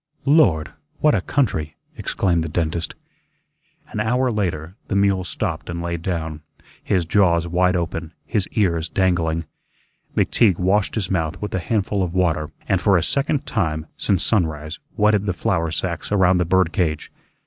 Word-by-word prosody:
"LORD! 135 - +4 0.3
what 150 - +3
a 100 - +2
country!" 80 - -1 0.2
exclaimed 85 -4 0
the 80 - -4
dentist. 80 +1 -2 0.9
An - - -5
hour 125 +4 +1
later, 90 -6 -2
the 100 - -2
mule 100 -2 +2
stopped 85 - -3
and 85 0 -3
lay 85 0 -2
down, 80 -2 -3 0.4
his 90 -3 +1
jaws 85 -2 +3
wide 90 +2 +2
open, 85 -1 -3
his 105 -4 0
ears 85 -6 +1
dangling. 85 -3 +1 0.7
McTeague 100 -7 +3
washed 95 +2 +1
his 100 -5 -2
mouth 85 -1 -1
with 105 - -5
a 95 - 0
handful 100 +2 -1
of 90 -1 -2
water 80 -5 +1 0.2
and 95 -2 +1
for 100 -3 +4
a 85 - +1
second 140 0 0
time 80 -7 -1
since 95 -4 +1
sunrise 80 -6 0 0.2
wetted 105 -1 +3
the 95 - +1
flour 90 -5 0
sacks 85 +3 -3
around 95 -3 +4
the 90 - +2
bird 95 -1 +2
cage. 80 -5 -1
90 Hz, 160 wpm, -21 LUFS, 80-100 Hz, 0.9 s, LORD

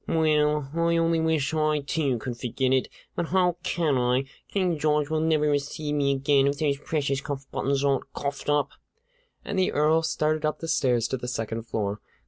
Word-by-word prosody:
"Well, 150 -2 +2
I 170 0 +2
only 165 0 +2
wish 160 -2 +1
I, 155 -1 +1
too, 140 -3 0
could 120 +2 -5
forget 130 +2 -1
it; 130 - +2 0.3
but 170 - -1
how 180 -1 +2
can 165 -6 0
I? 125 +2 +2 0.2
King 180 -5 0
George 150 0 +1
will 155 - +1
never 155 -1 +2
receive 145 +1 -1
me 140 -1 +2
again 135 0 +3
if 140 0 0
those 140 -2 0
precious 140 -3 -1
cuff 140 -1 -5
buttons 140 0 0
aren't 140 -1 0
coughed 140 +1 -4
up." 145 -1 +2 0.7
And 200 -1 -2
the 185 - +2
Earl 155 +2 +3
started 155 -1 0
up 155 0 0
the 165 - -6
stairs 120 -7 +2
to 130 - -1
the 125 - -6
second 115 -1 -4
floor. 105 -2 -2
150 Hz, 190 wpm, -26 LUFS, 135-160 Hz, 0.7 s, again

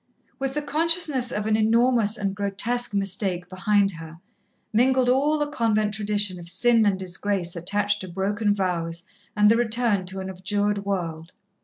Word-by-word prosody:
With 270 0 -3
the 300 - -1
consciousness 305 -4 +1
of 210 - -3
an 220 0 +2
enormous 225 0 +3
and 200 -2 -2
grotesque 210 +4 -1
mistake 190 -2 -2
behind 195 +1 +2
her, 165 -2 -10 0.6
mingled 255 +2 +3
all 285 +4 +2
the 295 - 0
convent 220 -7 0
tradition 205 -3 -1
of 170 -1 -5
sin 230 +2 +3
and 195 -2 +1
disgrace 185 -1 -2
attached 205 +4 -1
to 185 - -6
broken 205 +4 -1
vows 170 -4 -2 0.3
and 210 0 +6
the 230 - +4
return 230 -5 +1
to 190 +1 -6
an 190 - -5
abjured 205 +2 -1
world. 170 -4 -4
205 Hz, 160 wpm, -24 LUFS, 190-235 Hz, 0.6 s, and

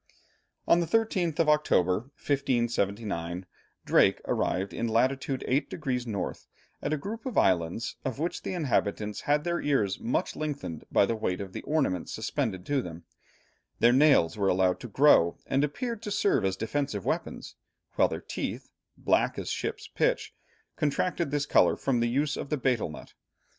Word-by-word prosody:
On 170 - +5
the 170 - -1
13th 190 -7 +1
of 165 - +2
October, 95 - +3 0.2
1579, 105 - -1 0.4
Drake - - +4
arrived 95 +2 -1
in 115 - -2
latitude 130 +3 0
8 135 +4 +1
degrees 125 -6 -3
north, 100 -4 -4 0.3
at - - -2
a 155 - +1
group 215 +10 -6
of 250 - -4
islands 90 +4 +1
of 130 -2 -3
which 165 +4 -2
the 185 - -4
inhabitants 105 - -1
had 145 +1 +1
their 170 +1 -1
ears 110 -9 +1
much 120 - -1
lengthened 145 - -4
by - - +5
the 115 - -1
weight 90 -4 -2
of 95 -2 -7
the - - -5
ornaments 135 - -1
suspended 110 -4 -2
to 140 -2 +1
them; 85 -4 -8 0.7
their 120 +1 +5
nails 135 - +5
were 100 - +2
allowed 90 -1 +2
to - - -7
grow, 110 - +4
and 135 +2 +1
appeared 230 - -3
to 215 - -5
serve 205 - +2
as 95 0 0
defensive 115 -2 -2
weapons, - - -3 0.4
while - - +4
their - - -5
teeth, - - -5 0.3
"black - - +1
as - - -3
ship's - - -4
pitch," - - 0 0.4
contracted 165 +2 0
this 145 0 0
colour - - +4
from 130 -3 0
the 120 0 +1
use 145 +4 0
of - - -5
the 150 - 0
betel 125 - 0
nut. 75 - -11
130 Hz, 170 wpm, -28 LUFS, 100-150 Hz, 0.7 s, On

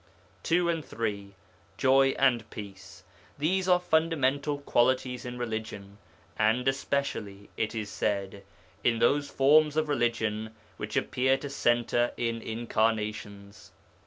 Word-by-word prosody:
2 175 +1 +1
and 165 -2 -1
3. 100 -5 -4 0.4
Joy 135 0 +4
and 125 -4 +2
Peace. 95 -3 -10 0.3
These 185 +6 0
are 180 0 +5
fundamental 150 -4 +1
qualities 125 -2 +1
in 125 0 -6
religion, 110 -4 -5 0.4
and 110 +4 +2
especially, 135 -7 -2
it 110 0 -2
is 105 -2 -4
said, 100 -1 -2 0.4
in 115 -1 +2
those 145 +4 +2
forms 150 +2 +4
of 155 0 +1
religion 110 -5 -1 0.2
which - - -4
appear 130 +1 +1
to 140 +1 -7
centre 120 -1 +1
in 115 -1 -2
incarnations. 110 -3 -3
120 Hz, 120 wpm, -28 LUFS, 110-140 Hz, 0.4 s, are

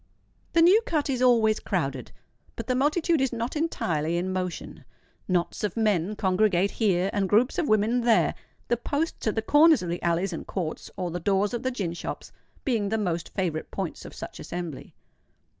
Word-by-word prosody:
The 330 - +5
New 385 +6 +6
Cut 295 -3 0
is 255 -2 -2
always 225 -4 +4
crowded; 135 - -3 0.4
but - - -5
the 255 - 0
multitude 305 +4 +2
is 265 - +1
not 235 +3 -3
entirely 170 - -1
in 185 +2 -2
motion. 180 -2 -4 0.4
Knots 180 +1 -1
of 210 +1 -2
men 210 -3 +1
congregate 195 -1 +2
here, 195 -4 +1
and 195 -2 0
groups 245 - +3
of 330 - 0
women 215 +3 +3
there—the 235 +1 0
posts 290 +3 -2
at 215 - +1
the 220 - -1
corners 300 - +5
of 175 - -4
the 175 - -3
alleys 170 +2 0
and 165 - -6
courts, 170 -5 -4
or 180 -2 -2
the 175 - -3
doors 200 +4 +1
of 240 - -2
the 260 - 0
gin 200 -10 -3
shops, 170 - -6 0.3
being 225 -6 0
the 220 - 0
most 175 -5 -2
favourite 170 -5 -2
points - - -5
of - - -10
such - - -8
assembly. 175 -5 -6
210 Hz, 185 wpm, -26 LUFS, 175-250 Hz, 0.4 s, New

